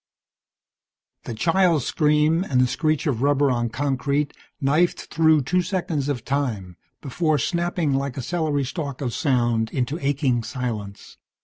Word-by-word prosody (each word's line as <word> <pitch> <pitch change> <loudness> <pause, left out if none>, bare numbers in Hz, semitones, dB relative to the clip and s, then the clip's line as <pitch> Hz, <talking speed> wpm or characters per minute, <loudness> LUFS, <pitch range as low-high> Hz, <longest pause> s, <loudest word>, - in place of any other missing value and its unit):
The 115 - -5
child's 165 - +2
scream 150 +2 +2
and 130 -9 0
the 130 - +5
screech 155 +5 0
of 130 -7 -1
rubber 140 0 +3
on 120 -1 0
concrete 140 +3 -1 0.2
knifed 155 +5 +1
through 160 -3 +4
two 180 +8 +1
seconds 175 -6 -2
of 125 -5 -3
time 115 -11 -2 0.3
before 155 +3 0
snapping, 170 0 0
like 135 -1 -2
a 130 - -3
celery 155 -2 -1
stalk 140 +1 -5
of 125 -4 -2
sound, 120 -7 +1
into 135 +5 -2
aching 135 -3 +1
silence. 110 -5 -6
140 Hz, 140 wpm, -23 LUFS, 125-160 Hz, 0.3 s, the